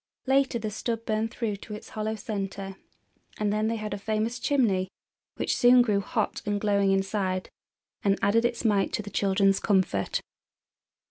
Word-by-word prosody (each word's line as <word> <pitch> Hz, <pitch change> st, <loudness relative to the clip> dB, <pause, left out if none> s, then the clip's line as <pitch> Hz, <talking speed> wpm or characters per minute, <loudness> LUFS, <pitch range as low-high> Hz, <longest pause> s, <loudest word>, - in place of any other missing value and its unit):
Later 270 Hz, -2 st, +2 dB
the 215 Hz, -2 st, -4 dB
stub 230 Hz, +2 st, -3 dB
burned 220 Hz, +1 st, 0 dB
through 220 Hz, -3 st, -3 dB
to 210 Hz, +2 st, -8 dB
its 210 Hz, -, -10 dB
hollow 215 Hz, 0 st, -3 dB
center, 195 Hz, -2 st, -5 dB, 0.6 s
and 210 Hz, -1 st, 0 dB
then 215 Hz, +1 st, +1 dB
they 230 Hz, -, 0 dB
had 215 Hz, -1 st, -4 dB
a 200 Hz, -, -4 dB
famous 220 Hz, +3 st, -1 dB
chimney, 225 Hz, -10 st, +2 dB, 0.5 s
which -, -, -1 dB
soon 245 Hz, 0 st, +6 dB
grew 210 Hz, -4 st, +1 dB
hot -, -, -2 dB
and 205 Hz, -1 st, -1 dB
glowing 200 Hz, -1 st, +2 dB
inside, 195 Hz, -1 st, -1 dB, 0.5 s
and 195 Hz, -1 st, +2 dB
added 225 Hz, +3 st, +3 dB
its 240 Hz, 0 st, -1 dB
mite 205 Hz, -3 st, +2 dB
to 215 Hz, -, -1 dB
the 205 Hz, -, -8 dB
children's 195 Hz, 0 st, +2 dB
comfort. 185 Hz, -, +1 dB
210 Hz, 170 wpm, -27 LUFS, 195-225 Hz, 0.6 s, soon